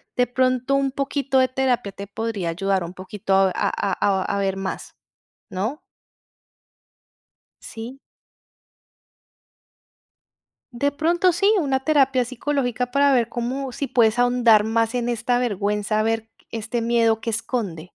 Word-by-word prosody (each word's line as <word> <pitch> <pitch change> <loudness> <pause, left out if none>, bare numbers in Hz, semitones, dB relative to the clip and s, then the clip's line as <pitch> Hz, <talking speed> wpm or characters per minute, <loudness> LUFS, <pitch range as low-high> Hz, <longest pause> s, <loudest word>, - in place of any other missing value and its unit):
de 250 - +3
pronto 255 +2 +1
un 275 -1 +1
poquito 275 -1 0
de 255 - +3
terapia 255 -5 0
te 200 +1 -9
podría 210 -4 -3
ayudar 190 +1 -1
un 175 - -8
poquito 190 +1 -4
a 190 -1 +4
a - - 0 0.3
a 190 -2 +2
a 200 - -2
ver 195 -1 0
más, 195 0 -6 0.5
¿no? 215 - -3 1.8
¿Sí? 235 +4 -8 2.7
De 285 +4 0
pronto 345 +5 +2
sí, 355 +4 +1
una 270 -4 0
terapia 270 -3 +2
psicológica 250 -1 -2
para 280 0 +4
ver 235 -3 +2
cómo 255 +2 -3
si 280 +2 -4
puedes 235 -1 +3
ahondar 245 -3 +4
más 225 +1 +1
en 240 -1 -1
esta 245 +1 0
vergüenza, 210 -2 -1
a - - +2
ver 225 0 -1 0.2
este 230 +1 -3
miedo 230 -1 +2
que 230 - -3
esconde. 215 -8 -3
235 Hz, 135 wpm, -22 LUFS, 210-265 Hz, 2.7 s, a